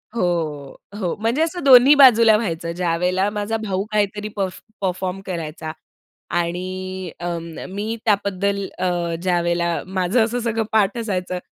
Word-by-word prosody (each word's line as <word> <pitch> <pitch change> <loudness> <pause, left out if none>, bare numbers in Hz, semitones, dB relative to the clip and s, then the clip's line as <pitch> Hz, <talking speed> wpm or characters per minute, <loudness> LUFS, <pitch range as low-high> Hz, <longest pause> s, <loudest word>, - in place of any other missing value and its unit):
हो, 160 -8 -2 0.2
हो. 180 -5 -1
म्हणजे 230 +7 0
असं 330 +1 -1
दोन्ही 265 +1 +8
बाजूला 230 -5 +7
व्हायचं. 170 -6 -3
ज्यावेळेला 180 +2 0
माझा 210 +1 -2
भाऊ 195 -3 -2
काहीतरी 210 0 0
परफॉ 190 -2 -3 0.3
परफॉर्म 185 +1 -3
करायचा 160 -3 -5 0.7
आणि 185 +1 -4
अ, 175 0 -3 0.3
मी 210 +4 -3
त्याबद्दल 200 -1 0
अ, 175 -2 -1
ज्यावेळेला 170 -1 +1
माझं 190 +5 +1
असं 235 +2 -1
सगळं 225 -1 -1
पाठ 210 -1 +2
असायचं 185 -5 -2
190 Hz, 130 wpm, -21 LUFS, 175-220 Hz, 0.7 s, दोन्ही